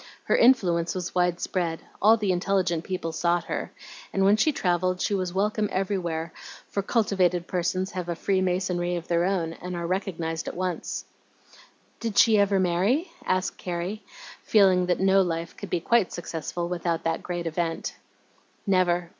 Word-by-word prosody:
Her -, -, +2 dB
influence 180 Hz, -10 st, +3 dB
was 180 Hz, -1 st, -4 dB
wide 180 Hz, -1 st, +1 dB
spread; 170 Hz, -3 st, -2 dB, 0.2 s
all 220 Hz, +3 st, +6 dB
the 205 Hz, -3 st, 0 dB
intelligent 180 Hz, -2 st, 0 dB
people 180 Hz, -3 st, -3 dB
sought 170 Hz, +1 st, +1 dB
her, -, -, -4 dB, 0.4 s
and 195 Hz, -, +1 dB
when 200 Hz, +2 st, +6 dB
she 265 Hz, +8 st, +3 dB
travelled 185 Hz, -, 0 dB
she 205 Hz, -, 0 dB
was 185 Hz, -3 st, -1 dB
welcome 210 Hz, +2 st, 0 dB
everywhere, 175 Hz, -4 st, -2 dB, 0.4 s
for 200 Hz, -, -1 dB
cultivated 190 Hz, -5 st, +1 dB
persons 185 Hz, +2 st, -1 dB
have 180 Hz, -2 st, -5 dB
a 170 Hz, -, -1 dB
free 190 Hz, +3 st, 0 dB
masonry 180 Hz, -1 st, 0 dB
of 170 Hz, 0 st, -5 dB
their 170 Hz, 0 st, +2 dB
own, 175 Hz, -4 st, 0 dB
and 180 Hz, +1 st, -6 dB
are 170 Hz, 0 st, -3 dB
recognized 170 Hz, -3 st, -2 dB
at -, -, -4 dB
once." 185 Hz, -2 st, -3 dB, 0.9 s
"Did 225 Hz, -3 st, -3 dB
she 220 Hz, -3 st, +6 dB
ever 200 Hz, -1 st, +3 dB
marry?" 190 Hz, -, +1 dB, 0.2 s
asked 185 Hz, 0 st, 0 dB
Carrie, 180 Hz, +4 st, -4 dB, 0.4 s
feeling 190 Hz, -4 st, +4 dB
that 180 Hz, -, +1 dB
no 195 Hz, 0 st, +4 dB
life 170 Hz, -2 st, -2 dB
could 200 Hz, -, -8 dB
be 175 Hz, -, 0 dB
quite 225 Hz, +3 st, +2 dB
successful 170 Hz, 0 st, -4 dB
without 170 Hz, -1 st, -2 dB
that 165 Hz, 0 st, -1 dB
great 175 Hz, -1 st, -4 dB
event. 165 Hz, 0 st, -2 dB, 0.7 s
"Never. 180 Hz, -3 st, +2 dB
180 Hz, 165 wpm, -26 LUFS, 170-195 Hz, 0.9 s, all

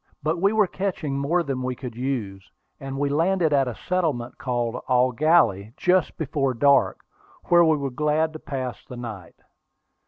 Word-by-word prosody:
But 160 Hz, +3 st, -1 dB
we 200 Hz, +1 st, +4 dB
were 215 Hz, -1 st, +3 dB
catching 180 Hz, -7 st, -3 dB
more 170 Hz, +5 st, +1 dB
than 135 Hz, -4 st, -3 dB
we 125 Hz, 0 st, -2 dB
could 125 Hz, -3 st, -8 dB
use, 115 Hz, -7 st, -4 dB, 0.3 s
and 135 Hz, -1 st, -6 dB
we 145 Hz, +1 st, 0 dB
landed 165 Hz, +2 st, +1 dB
at 135 Hz, -2 st, +3 dB
a 120 Hz, -, -4 dB
settlement 155 Hz, -10 st, -1 dB
called 120 Hz, -1 st, -2 dB
Eau 125 Hz, 0 st, +3 dB
Gallie 120 Hz, -, +2 dB
just 180 Hz, -2 st, +1 dB
before 135 Hz, -4 st, -1 dB
dark, 140 Hz, +3 st, +3 dB, 0.5 s
where 175 Hz, 0 st, +6 dB
we 160 Hz, -2 st, +3 dB
were 140 Hz, -2 st, -3 dB
glad 150 Hz, +4 st, 0 dB
to 155 Hz, -, -8 dB
pass 130 Hz, -4 st, -5 dB
the 125 Hz, -, -10 dB
night. 105 Hz, -8 st, -8 dB
140 Hz, 175 wpm, -24 LUFS, 125-160 Hz, 0.5 s, where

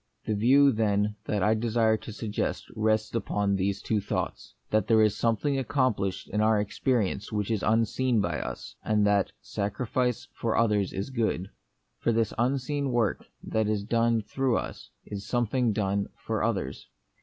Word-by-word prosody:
The 110 Hz, -, 0 dB
view, 135 Hz, +7 st, +5 dB
then, 105 Hz, -2 st, +1 dB
that 105 Hz, -3 st, 0 dB
I 105 Hz, -, +4 dB
desire 110 Hz, 0 st, +2 dB
to 110 Hz, -, -7 dB
suggest 105 Hz, -1 st, -3 dB
rests 110 Hz, 0 st, +1 dB
upon 105 Hz, -3 st, 0 dB
these 95 Hz, +1 st, -1 dB
two 110 Hz, -2 st, 0 dB
thoughts: -, -, -4 dB, 0.2 s
that 110 Hz, 0 st, +2 dB
there 110 Hz, -2 st, +5 dB
is 105 Hz, -2 st, +2 dB
something 135 Hz, +5 st, +1 dB
accomplished 130 Hz, -9 st, 0 dB
in 105 Hz, -, -1 dB
our 110 Hz, 0 st, +4 dB
experience 105 Hz, -1 st, -1 dB
which 105 Hz, 0 st, -1 dB
is 110 Hz, -4 st, 0 dB
unseen 115 Hz, +2 st, +2 dB
by 105 Hz, -, -1 dB
us; -, -, -6 dB
and 105 Hz, -1 st, +2 dB
that 100 Hz, -1 st, +2 dB
sacrifice 120 Hz, +4 st, -2 dB
for 115 Hz, -1 st, -1 dB
others 105 Hz, -4 st, +2 dB
is 100 Hz, +6 st, -4 dB
a -, -, -12 dB
good. 110 Hz, -5 st, -1 dB, 0.5 s
For -, -, +1 dB
this 115 Hz, -2 st, +1 dB
unseen 135 Hz, +3 st, 0 dB
work 115 Hz, -4 st, 0 dB, 0.2 s
that 110 Hz, -1 st, 0 dB
is 105 Hz, -2 st, 0 dB
done 115 Hz, +1 st, +2 dB
through 130 Hz, +2 st, 0 dB
us -, -, -6 dB, 0.2 s
is 100 Hz, -1 st, -6 dB
something 120 Hz, 0 st, +1 dB
done 100 Hz, -1 st, 0 dB
for -, -, -3 dB
others. -, -, -2 dB
110 Hz, 165 wpm, -28 LUFS, 105-120 Hz, 0.5 s, view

